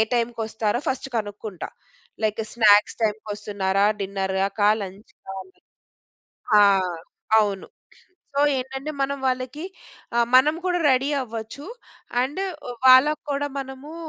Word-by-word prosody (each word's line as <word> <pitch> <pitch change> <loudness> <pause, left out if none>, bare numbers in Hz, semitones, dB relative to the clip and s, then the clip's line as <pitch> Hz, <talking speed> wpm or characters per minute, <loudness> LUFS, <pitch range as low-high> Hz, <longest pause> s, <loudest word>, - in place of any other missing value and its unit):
టైమ్‌కొస్తారో 230 -2 -1
first 265 +1 -2
కనుక్కుంటా. 205 -3 -5 0.5
Like 215 0 0
snacks 210 -3 +5
టైమ్‌కొస్తున్నారా, 205 -2 -1 0.2
డిన్నర్‌కా, 195 +1 0
లంచ్‌కా 195 0 -10
అని 185 0 -23 1.0
ఆ! - - +8 0.8
అవును. 200 -3 0 0.7
సో, 280 - +1 0.2
ఏంటంటే 265 +3 -5
మనం 280 +1 -1
వాళ్ళకి 255 +5 -3 0.5
ఆహ్, 235 0 +3
మనం 295 +4 +5
కూడా 355 -1 +1
రెడీ 265 +2 +2
అవ్వచ్చు. 230 +4 -7 0.6
అండ్ 285 +9 -3 0.3
వ్ 245 - -5
వాళ్ళకు 275 +4 +6
కూడా 285 +1 -1
మనమూ, 270 +3 -8
230 Hz, 105 wpm, -23 LUFS, 205-265 Hz, 1.0 s, ఆ